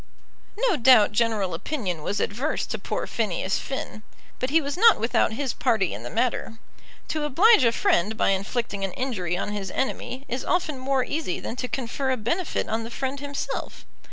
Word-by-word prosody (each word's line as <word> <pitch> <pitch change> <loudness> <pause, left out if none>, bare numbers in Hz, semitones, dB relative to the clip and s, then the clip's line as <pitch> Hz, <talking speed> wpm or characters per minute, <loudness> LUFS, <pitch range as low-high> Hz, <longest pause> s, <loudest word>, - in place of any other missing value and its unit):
No 390 -9 +2
doubt 235 -4 +6
general 210 -4 +1
opinion 185 - -3
was 200 +6 -2
adverse 255 +12 -1
to - - -4
poor - - -3
Phineas 195 -3 -1
Finn, 265 -5 -5 0.4
but 255 - -1
he 320 +4 +4
was 285 -2 -3
not 450 +3 +6
without 230 -1 +2
his 265 +2 -2
party 225 -7 +1
in 100 - -6
the 120 - -6
matter. 225 - -1 0.5
To 310 -1 -1
oblige 345 - +5
a 230 - +5
friend 215 -1 +1
by - - +2
inflicting 200 +1 -1
an 195 -2 -2
injury 185 -10 -2
on 200 - -3
his 200 -2 -4
enemy 265 +2 -3
is 250 +2 -3
often 325 -6 0
more 265 0 +1
easy 290 - -2
than - - -5
to 250 - -2
confer 265 +1 -2
a 260 - +1
benefit 320 - -1
on 225 +1 -1
the 225 - -6
friend 265 +3 -3
himself. 285 0 -5
240 Hz, 185 wpm, -25 LUFS, 205-275 Hz, 0.5 s, doubt